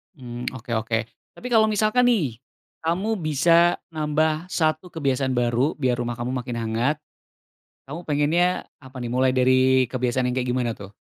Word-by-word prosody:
Mmm, 125 Hz, -3 st, -7 dB
oke 120 Hz, -1 st, -9 dB
oke. 115 Hz, 0 st, -1 dB, 0.4 s
Tapi 250 Hz, -, -7 dB
kalau 220 Hz, -2 st, +5 dB
misalkan 215 Hz, +4 st, +2 dB
nih, 150 Hz, -, +1 dB, 0.4 s
kamu 190 Hz, +7 st, -1 dB
bisa 165 Hz, +2 st, +4 dB, 0.2 s
nambah 155 Hz, +1 st, 0 dB
1 155 Hz, -1 st, 0 dB
kebiasaan 135 Hz, -5 st, -1 dB
baru 120 Hz, +5 st, +1 dB
biar 125 Hz, -4 st, 0 dB
rumah 120 Hz, 0 st, -2 dB
kamu 120 Hz, +2 st, -4 dB
makin 125 Hz, -1 st, -4 dB
hangat, 115 Hz, +5 st, 0 dB, 0.9 s
kamu 155 Hz, +4 st, -6 dB
pengennya 150 Hz, +4 st, +2 dB, 0.3 s
apa 130 Hz, -2 st, -15 dB
nih, 120 Hz, -, -4 dB
mulai 130 Hz, +1 st, +2 dB
dari 130 Hz, 0 st, +3 dB
kebiasaan 125 Hz, 0 st, 0 dB
yang -, -, -3 dB
kayak 125 Hz, -, -2 dB
gimana 125 Hz, -2 st, 0 dB
tuh? 100 Hz, 0 st, -10 dB
130 Hz, 155 wpm, -24 LUFS, 125-160 Hz, 0.9 s, kalau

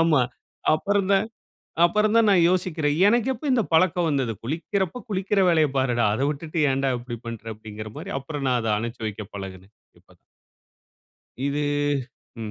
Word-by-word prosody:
ஆமா. 165 Hz, -4 st, +4 dB, 0.5 s
அப்புறம் 200 Hz, +4 st, 0 dB
தான் 195 Hz, +3 st, +3 dB, 0.6 s
அப்புறம் 210 Hz, +5 st, +3 dB
தான் 230 Hz, -2 st, +5 dB
நான் 185 Hz, -4 st, +5 dB
யோசிக்கிறேன். 165 Hz, -5 st, 0 dB
எனக்கு 235 Hz, +3 st, +2 dB
எப்போ 250 Hz, -, -9 dB
இந்த 240 Hz, -3 st, +3 dB
பழக்கம் 175 Hz, +1 st, +3 dB
வந்தது. 135 Hz, -6 st, 0 dB
"குளிக்கிறப்போ 180 Hz, -, -2 dB
குளிக்கிற 195 Hz, 0 st, 0 dB
வேலையைப் 155 Hz, -5 st, +3 dB
பாருடா. 120 Hz, -4 st, +2 dB
அத 120 Hz, -, -3 dB
விட்டுட்டு 155 Hz, +2 st, -4 dB
ஏன்டா 135 Hz, 0 st, 0 dB
இப்டி 120 Hz, 0 st, -6 dB
பண்ற?" 115 Hz, -2 st, -6 dB
அப்படின்கிற 110 Hz, 0 st, -9 dB
மாரி. -, -, -6 dB
அப்புறம் 140 Hz, 0 st, -5 dB
நான் 125 Hz, -, +2 dB
அத 110 Hz, -, -1 dB
அனச்சு 115 Hz, +2 st, -5 dB
வைக்க 105 Hz, 0 st, -6 dB
பழகுனேன். 95 Hz, +1 st, -8 dB, 0.3 s
இப்ப -, -, -24 dB, 1.3 s
இது 140 Hz, +1 st, -1 dB, 0.8 s
ம். 110 Hz, -, -5 dB
150 Hz, 155 wpm, -24 LUFS, 120-190 Hz, 1.3 s, தான்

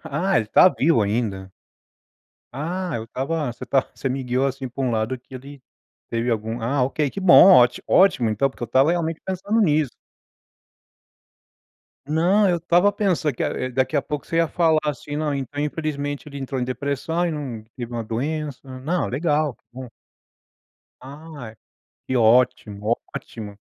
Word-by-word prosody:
ah 165 Hz, +6 st, 0 dB
ele 110 Hz, -, +2 dB
está 180 Hz, -, +6 dB
vivo 145 Hz, -8 st, +2 dB
ainda. 100 Hz, -3 st, -2 dB, 1.0 s
Ah, 170 Hz, +5 st, -3 dB
eu 110 Hz, -, -5 dB
estava 135 Hz, +3 st, -3 dB
você 120 Hz, -, -16 dB
está 135 Hz, +2 st, +2 dB
você 135 Hz, -, -3 dB
me 130 Hz, +1 st, -3 dB
guiou 125 Hz, +2 st, 0 dB
assim 135 Hz, -1 st, -3 dB
para 125 Hz, +3 st, -5 dB
um 125 Hz, -, 0 dB
lado 110 Hz, +3 st, -1 dB
que 130 Hz, +1 st, -24 dB
ele 140 Hz, +1 st, -12 dB, 0.5 s
teve 115 Hz, +1 st, -2 dB
algum, 115 Hz, +1 st, -2 dB
ah 125 Hz, +4 st, 0 dB
ok, 140 Hz, +3 st, 0 dB
que 195 Hz, -, -6 dB
bom, 185 Hz, -4 st, +8 dB, 0.2 s
ótimo 185 Hz, -, +4 dB
então, 110 Hz, +6 st, +1 dB
porque 130 Hz, -, -13 dB
eu -, -, -8 dB
estava 130 Hz, +7 st, +3 dB
realmente 165 Hz, -2 st, -1 dB
pensando 190 Hz, +4 st, -1 dB
nisso. 155 Hz, -, +2 dB, 2.2 s
Não, 180 Hz, +7 st, +3 dB
eu 175 Hz, -, +2 dB
estava 175 Hz, +4 st, +3 dB
pensando 180 Hz, -, 0 dB
que 130 Hz, +1 st, -2 dB
daqui 130 Hz, +4 st, -1 dB
a -, -, +3 dB
pouco 150 Hz, -1 st, -5 dB
você 165 Hz, -, -3 dB
ia 165 Hz, -1 st, +3 dB
falar 165 Hz, -3 st, +2 dB
assim: 145 Hz, 0 st, -4 dB
"Não, 150 Hz, -1 st, -1 dB
então 140 Hz, +1 st, -4 dB
infelizmente 145 Hz, -1 st, -3 dB
ele 140 Hz, -1 st, -8 dB
entrou 135 Hz, -1 st, -4 dB
em -, -, 0 dB
depressão 140 Hz, +6 st, -2 dB
e -, -, -1 dB
não 135 Hz, -8 st, -5 dB
teve 120 Hz, -2 st, -6 dB
uma 120 Hz, -1 st, -3 dB
doença", 145 Hz, +5 st, -3 dB, 0.2 s
não 170 Hz, +7 st, -1 dB
legal, 150 Hz, 0 st, 0 dB
que -, -, -39 dB
bom. 125 Hz, -1 st, -9 dB, 1.1 s
Ai, 140 Hz, -3 st, -10 dB, 0.5 s
que 130 Hz, -, -1 dB
ótimo, 115 Hz, -2 st, +2 dB, 0.2 s
ótimo. 105 Hz, -3 st, -8 dB
140 Hz, 165 wpm, -22 LUFS, 125-160 Hz, 2.2 s, bom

